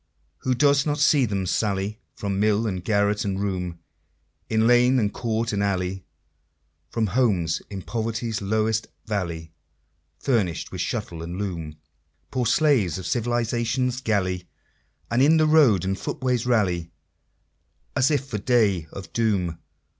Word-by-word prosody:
Who 130 -1 0
does 140 +1 +4
not 150 -1 -1
see 145 -1 +4
them 100 -4 -2
sally 100 +2 -1 0.2
From 100 -1 -2
mill, 105 +1 +2
and 95 -4 -3
garret, 100 0 +1
and 95 -1 -2
room, 90 -4 -2 0.7
In 110 0 +2
lane, 125 +2 +5
and 105 -4 +1
court 115 -1 -1
and 100 - 0
alley, 95 -1 -1 0.8
From 115 -1 0
homes 95 -8 +1
in 95 -3 -6
poverty's 115 -1 -3
lowest 110 +2 0 0.2
valley, 85 -7 -3 0.6
Furnished 105 - 0
with - - -4
shuttle 85 -1 -3
and 85 +2 -5
loom 85 -6 -4 0.6
Poor 125 -2 0
slaves 125 - +3
of 95 - -7
Civilization's 120 +2 0
galley 95 -6 -1 0.6
And 120 +2 +3
in 155 +4 +6
the 155 - +4
road 140 - +5
and 95 +1 0
footways 125 -2 -1
rally, 90 -8 +1 1.1
As 130 0 +3
if 145 -3 +1
for 110 -6 -4
the - - -15
Day 105 -10 +2
of 95 -4 -9
Doom? 95 -8 0
110 Hz, 145 wpm, -24 LUFS, 95-120 Hz, 1.1 s, in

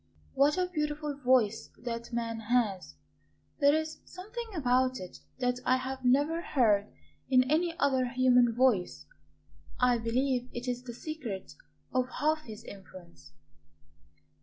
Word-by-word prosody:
"What 285 +3 +3
a 365 - +2
beautiful 300 -4 -3
voice 250 -5 +2
that 235 0 -5
man 230 -1 -2
has! 225 -4 0 0.6
There 285 0 +5
is 315 0 -3
something 435 +6 -8
about 255 -3 +2
it 180 -1 -9 0.2
that 250 -1 0
I 255 0 +3
have 260 0 -5
never 290 +7 +3
heard 210 -10 +2 0.4
in 255 -1 +5
any 330 +5 0
other 260 -3 +2
human 250 -1 +4
voice. 245 -8 +1 0.7
I 250 -1 +3
believe 250 +2 0
it 240 +1 -6
is 245 0 -2
the 240 -2 -8
secret 245 -11 -6 0.4
of 255 0 +1
half 310 +1 +1
his 220 0 -9
influence." 185 - -13
255 Hz, 135 wpm, -30 LUFS, 235-290 Hz, 0.7 s, There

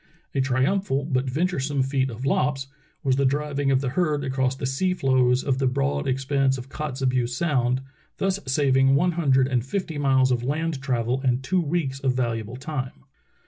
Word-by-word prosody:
A 135 - +1
triumphal 135 +3 +1
but 130 -3 0
venturesome 145 -2 0
feat 135 0 0
of 120 +2 -6
Lopp's 135 -1 +1 0.4
was 135 -2 +2
the 140 - +2
driving 145 +1 0
of 135 -1 +3
the 135 - -1
herd 150 -1 0
across 130 -1 0
the 135 - -5
sea 180 +8 0
floes 130 -4 +2
of 135 -2 0
the 135 - +2
broad 140 +2 0
expanse 135 0 +1
of 130 +1 -9
Kotzebue 130 -4 -1
Sound, 125 -2 0 0.4
thus 195 0 0
saving 135 0 +3
one 175 +5 +3
hundred 135 -6 +2
and 125 -3 0
fifty 160 +1 -3
miles 130 -2 +3
of 120 -2 +1
land 150 +2 -2
travel 125 -1 -1
and 130 -1 +1
two 180 +6 +1
weeks 145 -4 -2
of 130 -2 0
valuable 115 -2 -2
time. 130 - -5
135 Hz, 180 wpm, -24 LUFS, 130-145 Hz, 0.4 s, of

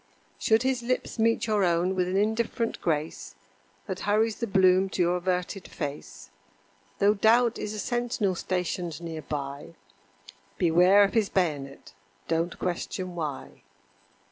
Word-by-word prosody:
Should 220 +2 +3
his 260 -2 0
lips 245 0 -2
meet 230 +1 +2
your 210 -3 +1
own 175 +1 +2
with 180 -1 0
an 185 +1 0
indifferent 220 +2 -1
grace 155 -1 -2 0.5
That 190 -3 -5
hurries 215 +2 +1
the 235 - -3
bloom 190 -1 +4
to - - -2
your 175 +1 +1
averted 180 +1 -2
face, 145 0 -7 0.7
Though 205 +1 +4
Doubt 230 +3 +3
is 210 0 -4
a - - -5
sentinel 240 -4 -1
stationed 180 -2 -3
near 165 -2 -6
by, 145 +2 -6 0.8
Beware 180 +4 +5
of 200 - +1
his 220 -4 +2
bayonet 145 -7 -2 0.3
don't 165 +1 -1
question 180 0 -3
why. 155 -5 -6
185 Hz, 140 wpm, -27 LUFS, 170-215 Hz, 0.8 s, Beware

